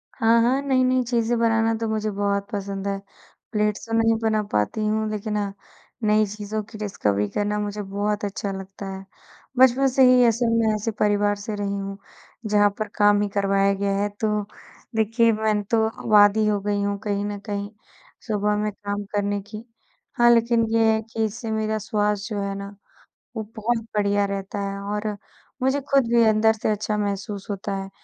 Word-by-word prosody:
हाँ, 230 +1 +4
हाँ। 255 +4 +2
नई-नई 255 -2 +2
चीज़ें 235 -1 0
बनाना 225 -1 +2
तो 225 - 0
मुझे 215 0 -1
बहुत 200 0 -1
पसंद 200 -1 -4
है। 195 0 -1 0.5
प्लेट्स 210 0 0
तो 225 - -5
मै 225 - +3
नहीं 225 - +4
बना 220 -1 +1
पाती 105 - 0
हूँ 215 0 0
लेकिन 210 0 -3
हाँ, 200 -1 -2 0.5
नई 215 0 +4
चीज़ों 210 +1 -4
की 215 +1 -12
डिस्कवरी 105 - -1
करना 210 - -1
मुझे 205 0 -3
बहुत 205 +2 -2
अच्छा 200 0 -3
लगता 195 +1 -8
है। 190 0 -9 0.5
बचपन 260 +1 +5
से 265 +1 +3
ही 250 0 +6
ऐसे 230 +1 +1
मैं 220 -1 +2
ऐसे 215 +2 -2
परिवार 205 0 +2
से 205 +1 -5
रही 200 -1 -2
हूँ, 195 0 -5 0.5
जहाँ 205 -1 +4
पर 215 - -1
काम 205 0 +4
ही 210 - +1
करवाया 195 0 +2
गया 200 0 -1
है, 205 +1 0
तो 210 +1 -1 0.5
देखिए 225 +1 +3
मैं 215 -1 0
तो 220 +2 +1
अब 220 0 -5
आदी 205 +1 +6
ही 215 - +2
हो 205 -1 +1
गई 205 0 -1
हूँ 200 0 -1
कहीं 205 -1 -1
न 205 -1 -4
कहीं 205 -1 -3 0.6
सुबह 210 -1 +1
में 210 0 -1
काम 205 0 -5
करने 205 0 0
की। 215 +2 -9 0.5
हाँ, 240 0 +6
लेकिन 230 0 +3
ये 225 -1 +4
है 220 - 0
कि 225 - -1
इससे 225 +1 -5
मेरा 220 0 -1
स्वस्थ 210 0 -1
जो 210 -2 -3
है 200 0 -2
ना 200 0 -8 0.6
वो 220 - -3
बहुत 225 +1 -1
बढ़िया 205 0 +2
रहता 200 0 -4
है 200 - -5
और 210 +1 -2 0.5
मुझे 265 +2 +1
खुद 270 -4 +5
भी 235 -1 +6
अंदर 220 +1 +4
से 215 0 -1
अच्छा 210 0 -1
महसूस 200 0 -3
होता 200 0 -3
है, 195 0 -5
210 Hz, 195 wpm, -23 LUFS, 200-220 Hz, 0.6 s, ही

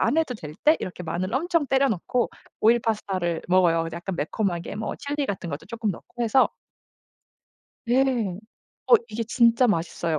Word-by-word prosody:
안 310 - +2
해도 315 -6 +1
될 150 -7 -9
때 310 +2 +6
이렇게 180 -1 -6
마늘을 180 +7 -3
엄청 335 0 +1
때려 270 +1 +3
넣고 240 +5 -1 0.3
오일 230 +2 +5
파스타를 190 -7 -1
먹어요. 175 -3 +4
이제 165 +1 -6
약간 175 +1 -5
매콤하게 175 +2 -2
뭐 220 - -3
칠리 285 0 -3
같은 185 -5 -4
것도 145 +1 -6
쪼끔 225 -2 -2
넣고 240 +6 -7
해서 245 +3 +4 1.4
네, 250 +3 +4 0.9
어 - - +8
이게 230 - -3
진짜 235 +2 +4
맛있어요. 165 -4 -1
215 Hz, 335 characters per minute, -25 LUFS, 175-250 Hz, 1.4 s, 어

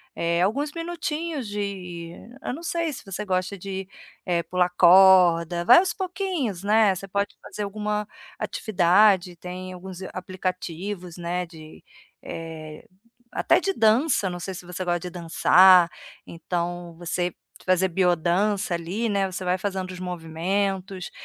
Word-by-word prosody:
eh, 170 +1 0
alguns 275 +11 0
minutinhos 330 -4 -4
de 185 -5 -5 0.3
eu - - -3
não 305 - -7
sei 335 -2 -1
se - - -9
você 195 +2 -5
gosta 185 +1 -1
de, 190 0 -6 0.4
eh, 175 -3 0
pular 180 0 +1
corda. 175 -2 +6
Vai 245 - +9
aos 365 -1 0
pouquinhos, 360 - -3
né. 210 -1 +4
Você 195 +2 -7
pode 200 +1 -2
fazer 210 - -6
alguma 210 +1 -3 0.3
atividade, 185 -2 +3
tem 180 +2 -7
alguns 185 0 -9
aplicativos, 185 0 -5
né, 175 +1 -2
de, 160 -2 -13 0.4
eh, 160 -2 -8 0.5
até - - +3
de 390 - -1
dança, 225 - +3
não 175 0 -6
sei 190 +2 -5
se 180 - -9
você 180 +1 -5
gosta 175 0 0
de 180 - -6
dançar, 175 +1 +5 0.4
então 175 0 -4
você 175 +1 -2 0.3
fazer 185 0 +2
bio-dança 180 +3 +1
ali 180 +7 -2
né. 200 -2 +1
Você 185 +1 -5
vai 180 +1 +1
fazendo 190 -1 -3
os 180 - -9
movimentos 185 +2 -3
185 Hz, 140 wpm, -24 LUFS, 175-205 Hz, 0.5 s, Vai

